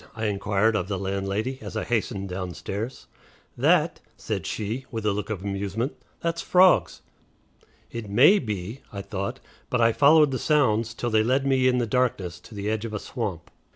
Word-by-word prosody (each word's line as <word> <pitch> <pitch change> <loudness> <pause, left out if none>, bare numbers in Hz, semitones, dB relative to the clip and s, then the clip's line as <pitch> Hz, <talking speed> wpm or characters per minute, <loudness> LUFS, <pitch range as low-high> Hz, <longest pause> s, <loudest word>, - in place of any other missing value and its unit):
I 110 0 -3
inquired 105 +1 +1
of 95 -4 -1
the 100 -1 -2
landlady 100 +6 -2
as - - -6
I - - -1
hastened 105 -4 -1
downstairs. 95 +6 -5 0.5
"That?" - - +3 0.2
said - - -4
she, 110 +5 -4
with 110 -3 -5
a 105 - +2
look 105 +1 -4
of 100 -4 -4
amusement; 100 - -2 0.3
"that's 170 0 -1
frogs." 185 0 +4 0.9
"It 115 -3 -6
may 140 - +6
be," 105 - -5
I 100 -1 -6
thought, 100 -1 -4 0.3
but 125 - 0
I 115 0 +5
followed 150 +2 +6
the 130 - -2
sounds 115 -7 +2
till 120 0 -2
they 110 0 +4
led 130 +4 +1
me 130 -1 +3
in 125 -1 +3
the 120 - +1
darkness 110 -7 -1
to 115 - -14
the 100 0 -4
edge 110 0 -1
of 110 -2 -4
a - - -2
swamp. 100 -10 -5
110 Hz, 185 wpm, -25 LUFS, 100-125 Hz, 0.9 s, may